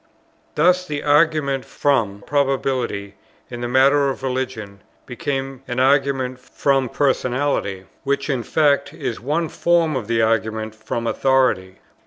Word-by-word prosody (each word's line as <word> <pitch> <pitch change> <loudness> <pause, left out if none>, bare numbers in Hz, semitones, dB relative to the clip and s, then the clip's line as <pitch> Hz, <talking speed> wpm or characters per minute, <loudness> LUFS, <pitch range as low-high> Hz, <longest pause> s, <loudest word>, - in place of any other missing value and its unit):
Thus 180 +4 +3
the 145 -1 -4
argument 145 -3 +2
from 110 -8 0
Probability, 130 -8 -1 0.4
in 120 -1 -6
the 120 - -2
matter 135 +3 +4
of 135 - -5
religion, 125 -6 -4 0.2
became 135 +1 -4
an 125 0 -3
argument 135 -1 +2
from 135 0 0
Personality, 130 -8 0 0.2
which 140 0 -1
in 135 -4 -1
fact 145 +1 +1
is 125 -6 -4
one 155 +6 -1
form 170 -2 +1
of 120 -6 -3
the 115 -1 +1
argument 110 -1 0
from 115 +2 -5
Authority. 120 -8 +1
130 Hz, 130 wpm, -21 LUFS, 115-140 Hz, 0.4 s, matter